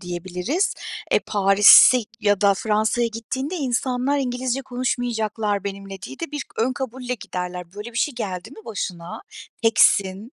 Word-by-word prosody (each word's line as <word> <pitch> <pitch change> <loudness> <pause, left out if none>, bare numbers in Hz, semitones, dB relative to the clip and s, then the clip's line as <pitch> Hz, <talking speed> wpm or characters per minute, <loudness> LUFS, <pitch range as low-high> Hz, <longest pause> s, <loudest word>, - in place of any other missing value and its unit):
diyebiliriz. 180 - -2 0.4
E, - - +4
Paris'e 200 +5 +7 0.2
ya 205 -2 +2
da 200 -1 +4
Fransa'ya 220 +3 0
gittiğinde 260 - -4
insanlar 260 -2 -1
İngilizce 255 0 -2
konuşmayacaklar 225 -5 -2
benimle 195 -1 -7
diye 270 - -9
de 335 - -4
bir 295 -2 -3
ön 245 +3 +1
kabulle 250 -1 -4
giderler. 180 -4 -6
Böyle 210 +3 -8
bir 230 - -3
şey 295 - 0
geldi 195 -3 -5
mi 220 -5 -14
başına, 180 -6 -6 0.4
teksin. 210 0 +3
225 Hz, 140 wpm, -22 LUFS, 195-255 Hz, 0.4 s, Paris'e